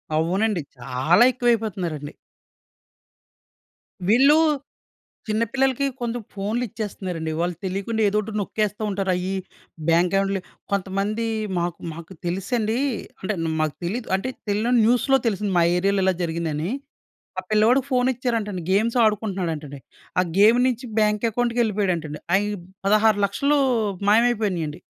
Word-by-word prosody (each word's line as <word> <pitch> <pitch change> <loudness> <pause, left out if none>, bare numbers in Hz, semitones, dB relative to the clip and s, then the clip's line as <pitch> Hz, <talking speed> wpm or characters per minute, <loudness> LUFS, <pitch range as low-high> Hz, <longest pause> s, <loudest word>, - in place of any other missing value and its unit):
అవునండి. 185 +4 +1 0.2
చాలా 130 - +3
ఎక్కువైపోతున్నారండి. 205 - -1 1.9
వీళ్ళు 270 +7 +6 0.9
చిన్న 215 +2 +1
పిల్లలకి 270 0 +1 0.2
కొంచెం 240 0 -2
ఫోనులు 210 +5 -2
ఇచ్చేస్తున్నారండి. 185 -6 -4
వాళ్ళు 175 0 -1
తెలియకుండా 200 +4 -2
ఏదోటి 210 +2 0
నొక్కేస్తూ 210 +1 -2
ఉంటారు. 195 -1 -1
అయి 180 +1 -2 0.6
బ్యాంక్ 175 +3 +3
అకౌంట్‌లు 195 0 0 0.3
కొంతమంది 200 +3 -1 0.3
మాకు 170 0 -3
మాకు 170 +3 -10
తెలుసండి 210 +6 -1 0.4
అంటే‌న్ 185 -4 -2 0.2
మాకు 155 -2 -1
తెలీదు. 220 +6 -3
అంటే 225 +7 -2 0.2
తెలియని 220 +5 +1
న్యూస్‌లో 250 +3 +4
తెలిసింది 205 -1 -1
మా 170 - +5
ఏరియా‌లో 195 +1 +1
ఇలా 190 - +3
జరిగిందని. 165 0 -2 0.7
ఆ - - -4
పిల్లవాడికి 235 +5 +4
ఫోన్ 250 0 +3
ఇచ్చారంటండి, 225 -6 -2
గేమ్స్ 225 +5 +2
ఆడుకుంటున్నాడంటండి. 180 -9 -2 0.4
ఆ - - +4 0.2
గేమ్ 225 +4 +6
నుంచి 250 0 -2
బ్యాంక్ 210 +1 +2
అకౌంట్‌కెళ్ళిపోయాడంటండి. 205 -10 0
అయి 205 +1 +2 0.4
16,00,000 215 +6 +3 0.5
మాయమైపోయినాయండి. 210 -9 +2
205 Hz, 110 wpm, -23 LUFS, 180-230 Hz, 1.9 s, వీళ్ళు